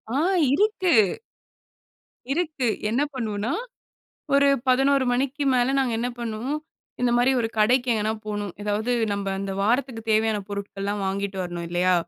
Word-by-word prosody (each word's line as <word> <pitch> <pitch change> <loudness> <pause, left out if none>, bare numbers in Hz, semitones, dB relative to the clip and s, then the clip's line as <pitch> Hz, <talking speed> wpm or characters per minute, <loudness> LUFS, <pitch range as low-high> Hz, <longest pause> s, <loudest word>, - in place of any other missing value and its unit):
ஆ - - +2 0.4
இருக்கு. 380 - +2 1.4
இருக்கு 305 -7 -1 0.2
என்ன 245 +6 +1
பண்வோன்னா 220 -3 -2 0.8
ஒரு 280 0 +5 0.2
11:00 270 +1 +4
மணிக்கு 275 +3 -1
மேல 250 +2 +2
நாங்க 255 -3 +1
என்ன 245 +1 -1
பண்ணுவோம். 235 +6 -3 0.4
இந்த 245 -1 +2
மாரி 245 +2 +4
ஒரு 225 - 0
கடைக்கு 245 +4 +3
எங்கனா 215 0 0
போணும். 205 -3 -3
எதாவது 210 +3 -1 0.2
நம்ப 200 -1 -3
அந்த 195 0 -3
வாரத்துக்கு 240 +1 0
தேவையான 220 0 +2
பொருட்கள்லாம் 200 0 -4
வாங்கிட்டு 195 0 -2
வரணும் 175 -1 -5
இல்லையா? 180 +1 +2
230 Hz, 135 wpm, -24 LUFS, 205-265 Hz, 1.4 s, ஒரு